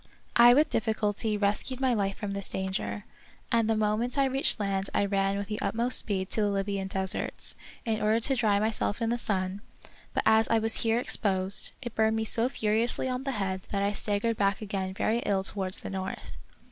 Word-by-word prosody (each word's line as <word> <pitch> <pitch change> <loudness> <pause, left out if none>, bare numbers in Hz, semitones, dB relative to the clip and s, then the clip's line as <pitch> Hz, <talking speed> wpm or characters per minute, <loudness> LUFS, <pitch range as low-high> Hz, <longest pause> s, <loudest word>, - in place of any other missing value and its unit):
I 240 +1 +8
with 300 +3 +3
dif 225 - 0
ficulty 215 0 0
rescued 210 +5 0
my 260 -2 +2
life 195 -3 -1
from 205 -2 -4
this 200 -1 -4
danger, 190 +2 -3 0.5
and 230 -1 +2
the 225 - +3
moment 215 +4 0
I 275 - +4
reached 270 -2 +1
land 195 -1 -1
I 200 - +3
ran 195 0 0
with 200 - -3
the 210 0 -4
ut - - -1
most 240 +2 +2
speed 190 -3 -2
to 220 - +2
the 205 - +2
Libyan 195 -1 -2
deserts, 190 +1 -3 0.3
in 220 -2 -1
order 215 +2 +3
to 270 +4 +1
dry 215 -5 +2
myself 215 -1 -1
in 230 -1 0
the 240 - 0
sun; 190 -2 -1 0.5
but - - +1
as 220 0 +5
I 225 - +4
was 225 0 +2
here 225 0 +1
exposed, 195 -5 0
it 240 -2 -5
burned 220 0 +2
me 220 0 -1
so 230 +3 +2
furiously 225 +2 0
on 255 +1 -3
the 275 - -1
head 190 -3 -3
that 200 -1 -1
I 200 +1 +1
staggered 210 +2 -1
back 200 -1 +1
again 195 -3 -4
very 225 +3 +1
ill 195 -4 0
towards 190 -1 -2
the - - -6
north. 190 0 -5
210 Hz, 210 wpm, -28 LUFS, 195-230 Hz, 0.5 s, I